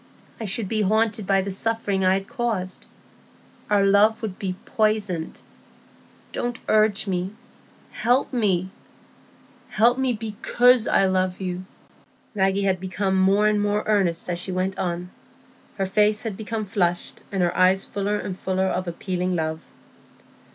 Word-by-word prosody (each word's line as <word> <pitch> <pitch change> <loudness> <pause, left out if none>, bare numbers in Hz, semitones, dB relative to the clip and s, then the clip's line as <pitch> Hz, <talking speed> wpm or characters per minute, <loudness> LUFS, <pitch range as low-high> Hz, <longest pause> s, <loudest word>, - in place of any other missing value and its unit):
I 225 - -4
should 205 +1 -1
be 215 +2 0
haunted 215 0 +1
by 195 -1 +3
the 195 +1 -4
suffering 200 -1 -1
I 185 0 +4
had 195 0 -3
caused. 210 -6 -3 0.8
Our 205 -1 +3
love 210 +3 +4
would 200 -4 -5
be 190 -3 -3
poisoned. 210 -6 -1 0.9
Don't 240 -1 -3
urge 215 -1 +3
me; 190 +1 -3 0.6
help 250 +4 +1
me,—help 210 +3 -2
me, 260 -2 +1
because 230 +2 +2
I 195 - +3
love 185 -1 0
you." 185 -1 -4 0.7
Maggie 195 -1 +1
had 190 -2 +1
become 190 +1 -1
more 195 +2 +3
and 210 -1 +2
more 205 +1 0
earnest 190 -6 +1
as 175 -1 -2
she 185 - -4
went 185 +1 -2
on; 175 0 -3 0.7
her 195 - 0
face 210 +2 +2
had 220 -4 -4
become 220 +1 -4
flushed, 180 -4 -1
and 195 -2 0
her 175 0 0
eyes 185 +1 +4
fuller 205 +1 -2
and 190 -2 -5
fuller 190 0 -1
of 185 -1 -2
appealing 180 +1 -2
love. 160 -1 -2
195 Hz, 145 wpm, -23 LUFS, 185-215 Hz, 0.9 s, I